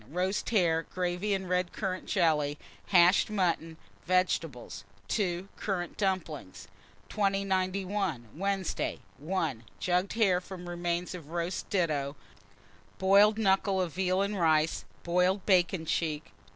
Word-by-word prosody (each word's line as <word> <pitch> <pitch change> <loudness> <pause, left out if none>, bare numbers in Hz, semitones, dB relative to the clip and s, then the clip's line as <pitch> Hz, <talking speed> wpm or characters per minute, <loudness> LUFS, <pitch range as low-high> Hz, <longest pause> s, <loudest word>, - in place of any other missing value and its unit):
Roast 185 +5 -1
hare, 170 -7 +3
gravy, 180 +4 -2
and 190 -1 -4
red 180 0 0
currant 185 -2 -4
jelly; 155 -6 +2 0.3
hashed 180 +1 +5
mutton, 170 -5 0 0.3
vegetables. 165 - 0 0.3
2. 185 -3 -1
Currant 180 -4 -3
dumplings. 175 - -3 0.4
2091. 195 - -1
Wednesday. 195 +1 -1 0.2
1. 155 -7 -2 0.2
Jugged 180 +2 0
hare, 195 -6 +3
from 180 -1 -9
remains 175 0 -2
of 165 -5 -9
roast 170 +2 -3
ditto; 150 -7 0 0.8
boiled 200 +3 +5
knuckle 195 -2 +2
of 175 -4 -1
veal 185 +1 +1
and 200 0 -2
rice; 160 -1 +2 0.2
boiled 180 +2 +1
bacon 180 -3 +3
cheek. 155 -2 -2
180 Hz, 115 wpm, -30 LUFS, 165-195 Hz, 0.8 s, hashed